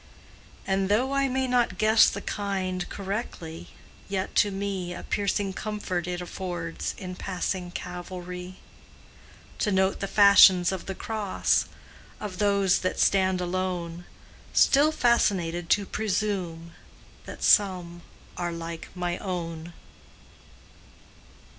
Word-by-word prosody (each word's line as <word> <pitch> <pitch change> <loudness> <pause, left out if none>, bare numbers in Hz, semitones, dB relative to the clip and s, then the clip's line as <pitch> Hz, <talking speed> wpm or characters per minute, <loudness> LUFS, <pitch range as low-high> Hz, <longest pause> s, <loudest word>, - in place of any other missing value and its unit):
And 195 0 0
though 245 +6 +2
I 275 0 +2
may 265 0 0
not 245 -7 +1
guess 220 +2 +6
the 200 - -5
kind 190 -3 -3
Correctly, 195 -5 -5 0.4
yet 195 -1 -2
to 205 - +5
me 195 -3 -3
A - - -8
piercing 200 -1 -1
comfort 185 -4 -3
it 180 0 -3
affords 175 -2 -5
In 185 -2 -6
passing 180 0 -3
Calvary, 180 +1 -7 1.0
To 210 - +1
note 190 0 +2
the 195 - -2
fashions 195 -3 +7
of 190 -2 -5
the 195 - -4
cross, 215 -1 0 0.5
Of 195 -3 -6
those 200 -2 +3
that 185 - -2
stand 190 -2 +3
alone, 175 -1 -3 0.5
Still 290 +3 +5
fascinated 180 - +1
to 205 - +3
presume 190 -6 -2 0.6
That - - -8
some 180 -4 +3 0.4
are 175 -1 -2
like 165 0 -6
my 175 -1 -2
own. 170 -3 -5
185 Hz, 115 wpm, -26 LUFS, 175-205 Hz, 1.0 s, fashions